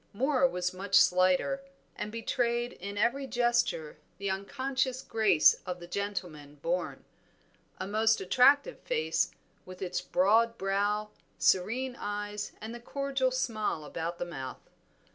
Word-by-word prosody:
Moor 265 Hz, +4 st, +3 dB
was 180 Hz, -5 st, -2 dB
much 195 Hz, +1 st, -2 dB
slighter, 185 Hz, +10 st, +4 dB, 0.3 s
and 210 Hz, -, -5 dB
betrayed 235 Hz, +1 st, -1 dB
in 200 Hz, +2 st, -7 dB
every 245 Hz, +6 st, +1 dB
gesture 240 Hz, -12 st, 0 dB, 0.2 s
the 195 Hz, 0 st, -2 dB
unconscious 260 Hz, +6 st, -2 dB
grace 215 Hz, -8 st, +4 dB
of 180 Hz, -1 st, -5 dB
the 175 Hz, -, -9 dB
gentleman 175 Hz, -6 st, -5 dB
born. 170 Hz, +5 st, -3 dB, 0.7 s
A -, -, -3 dB
most 220 Hz, +2 st, +2 dB
attractive 275 Hz, -, +4 dB
face, 480 Hz, -2 st, 0 dB, 0.3 s
with 185 Hz, 0 st, -11 dB
its 180 Hz, -1 st, -2 dB
broad 225 Hz, +6 st, +3 dB
brow, 205 Hz, +2 st, 0 dB, 0.3 s
serene 245 Hz, +7 st, +1 dB
eyes, 205 Hz, 0 st, -4 dB
and 220 Hz, +2 st, -7 dB
the 240 Hz, -, -7 dB
cordial 275 Hz, +1 st, -1 dB
smile 215 Hz, -10 st, -2 dB
about 165 Hz, +3 st, -4 dB
the 175 Hz, -, -3 dB
mouth. 135 Hz, -7 st, -7 dB
210 Hz, 130 wpm, -30 LUFS, 180-245 Hz, 0.7 s, slighter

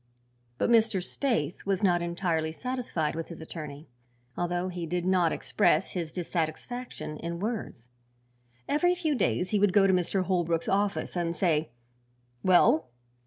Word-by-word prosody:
But -, -, +1 dB
Mr. 225 Hz, -3 st, +4 dB
Spaythe 185 Hz, -, -2 dB
was 195 Hz, +1 st, 0 dB
not 175 Hz, -3 st, +3 dB
entirely 170 Hz, -2 st, -1 dB
satisfied 240 Hz, -6 st, -2 dB
with 165 Hz, 0 st, -4 dB
his 170 Hz, -, -9 dB
attorney, 155 Hz, -2 st, -8 dB, 0.5 s
although 175 Hz, +1 st, -1 dB
he 175 Hz, -2 st, -4 dB
did 175 Hz, +1 st, -2 dB
not 185 Hz, -3 st, +3 dB
express 205 Hz, -, +1 dB
his 170 Hz, -4 st, -3 dB
dissatisfaction 175 Hz, +3 st, -4 dB
in 170 Hz, +2 st, -4 dB
words. 205 Hz, -, -4 dB, 0.8 s
Every 355 Hz, +5 st, +3 dB
few 325 Hz, -4 st, 0 dB
days 190 Hz, -6 st, 0 dB
he 210 Hz, -, +2 dB
would 200 Hz, -2 st, +3 dB
go 200 Hz, -1 st, +6 dB
to 190 Hz, -, +4 dB
Mr. 185 Hz, +1 st, +1 dB
Holbrook's 170 Hz, -3 st, 0 dB
office 200 Hz, 0 st, 0 dB
and 170 Hz, -1 st, -1 dB
say: 160 Hz, -4 st, +1 dB, 0.7 s
"Well?" 175 Hz, -4 st, +5 dB
180 Hz, 145 wpm, -28 LUFS, 165-205 Hz, 0.8 s, go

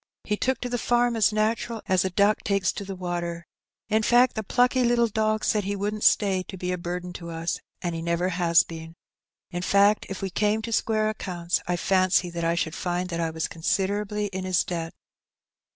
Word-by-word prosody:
He 210 Hz, -, -1 dB
took 255 Hz, +3 st, 0 dB
to 250 Hz, -, -2 dB
the 245 Hz, 0 st, -2 dB
farm 240 Hz, 0 st, +2 dB
as 220 Hz, -1 st, +3 dB
natural 220 Hz, +1 st, -1 dB
as 185 Hz, -1 st, +3 dB
a 190 Hz, -, 0 dB
duck 200 Hz, +3 st, +3 dB
takes 200 Hz, -2 st, +1 dB
to 205 Hz, -, -6 dB
the 195 Hz, -1 st, -6 dB
water. 175 Hz, -2 st, -4 dB, 0.4 s
In 220 Hz, +1 st, +2 dB
fact, 240 Hz, +3 st, +4 dB
the 220 Hz, -, -2 dB
plucky 250 Hz, +4 st, +2 dB
little 240 Hz, 0 st, +3 dB
dog 215 Hz, 0 st, 0 dB
said 210 Hz, -1 st, +1 dB
he 200 Hz, +1 st, -2 dB
wouldn't 210 Hz, +2 st, -3 dB
stay 195 Hz, -3 st, +3 dB
to 190 Hz, +1 st, -9 dB
be 180 Hz, 0 st, -3 dB
a 180 Hz, -, -1 dB
burden 180 Hz, +1 st, -5 dB
to 170 Hz, -1 st, -8 dB
us, 165 Hz, 0 st, -3 dB, 0.2 s
and 175 Hz, -1 st, -1 dB
he 165 Hz, -, -4 dB
never 170 Hz, +2 st, 0 dB
has 170 Hz, -2 st, +4 dB
been. 165 Hz, 0 st, -9 dB, 0.6 s
In 175 Hz, -, -3 dB
fact, 200 Hz, +3 st, +3 dB
if 195 Hz, 0 st, -6 dB
we 190 Hz, -, -2 dB
came 210 Hz, +3 st, +1 dB
to 230 Hz, -, -4 dB
square 215 Hz, -1 st, +1 dB
accounts, 180 Hz, -5 st, -2 dB
I 180 Hz, -, +1 dB
fancy 185 Hz, -1 st, +2 dB
that 170 Hz, 0 st, -4 dB
I 165 Hz, 0 st, +1 dB
should 160 Hz, -2 st, -1 dB
find 180 Hz, +1 st, -2 dB
that 170 Hz, -, -2 dB
I 165 Hz, -1 st, 0 dB
was 160 Hz, 0 st, -3 dB
considerably 205 Hz, +5 st, -1 dB
in 190 Hz, 0 st, -3 dB
his 185 Hz, -1 st, +2 dB
debt." 165 Hz, -2 st, -4 dB
190 Hz, 215 wpm, -25 LUFS, 175-215 Hz, 0.6 s, fact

